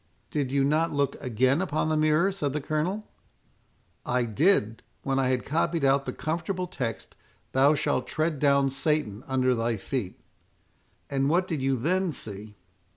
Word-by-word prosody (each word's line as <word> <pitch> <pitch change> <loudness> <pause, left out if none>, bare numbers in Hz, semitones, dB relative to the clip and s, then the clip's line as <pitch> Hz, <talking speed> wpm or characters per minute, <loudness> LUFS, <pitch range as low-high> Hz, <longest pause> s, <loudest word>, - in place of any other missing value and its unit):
"Did 140 -4 -1
you 140 0 +2
not 155 +4 +2
look 140 -1 0
again 130 +4 +2
upon 155 -4 -1
the 155 - +1
mirror?" 155 +5 +3
said 145 -8 -2
the 150 - -1
Colonel. 155 +8 -2 1.0
"I 125 -1 0
did, 115 - +2 0.2
when 135 0 0
I 130 - +2
had 130 -1 0
copied 165 0 0
out 135 0 +3
the - - -1
comfortable 175 +3 -3
text, 115 - -5 0.4
'Thou 140 +3 +4
shalt 130 -2 -1
tread 155 -2 -1
down 140 -1 +3
Satan 135 -6 -1
under 130 -1 +2
thy 115 -1 -1
feet.'" 105 -1 -4 0.9
"And 135 0 +1
what 180 +3 +2
did 160 -6 -2
you 135 0 +1
then 180 +6 0
see?" 105 -3 -6
140 Hz, 160 wpm, -27 LUFS, 130-155 Hz, 1.0 s, Thou